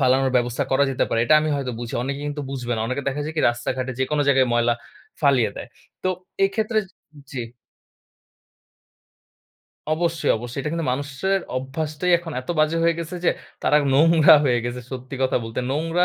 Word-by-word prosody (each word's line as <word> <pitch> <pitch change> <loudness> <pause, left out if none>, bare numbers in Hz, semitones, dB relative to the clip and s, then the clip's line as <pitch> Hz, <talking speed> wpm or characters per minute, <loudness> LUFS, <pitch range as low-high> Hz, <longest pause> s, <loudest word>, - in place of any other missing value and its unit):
ফালানোর 130 0 +3
ব্যবস্থা 125 +3 0
করা 135 +2 +4
যেতে 130 - +1
পারে। 115 - 0
এটা 155 - +5
আমি 155 - -1
হয়তো 130 -3 -3
বুঝি। 120 - -5
অনেকে 140 +2 -3
কিন্তু 145 0 -4
বুঝবে 125 -3 -3
না। - - -2
অনেকে 130 +3 -2
দেখা 140 +2 -3
যায় 155 +1 -5
কি - - +2
রাস্তাঘাটে 125 +2 -3
যেকোনো 145 +2 +1
জায়গায় 135 -2 +4
ময়লা 120 0 +3 0.5
ফালিয়ে 130 -7 +3
দেয়। - - -7 0.3
তো 185 - +1 0.4
এক্ষেত্রে 215 +3 0 0.5
জি। 130 - -4 2.5
অবশ্যই, 165 +1 0
অবশ্যই। 120 +3 -5
এটা 150 - -3
কিন্তু 165 -3 -2
মানুষের 145 +8 -1 0.2
অভ্যাসটাই, 150 +6 -2
এখন 170 -2 -8
এত 130 - -17
বাজে 155 +2 +3
হয়ে 170 0 +3
গেছে 170 +2 -5
যে, - - +5 0.3
তারা 150 - +4 0.2
নোংরা 160 +1 +7
হয়ে 125 -3 +3
গেছে। 120 +1 -4
সত্যি 130 +1 -6
কথা 130 - +2
বলতে। 115 +2 -4
নোংরা 165 +5 +1
140 Hz, 170 wpm, -23 LUFS, 130-160 Hz, 2.5 s, নোংরা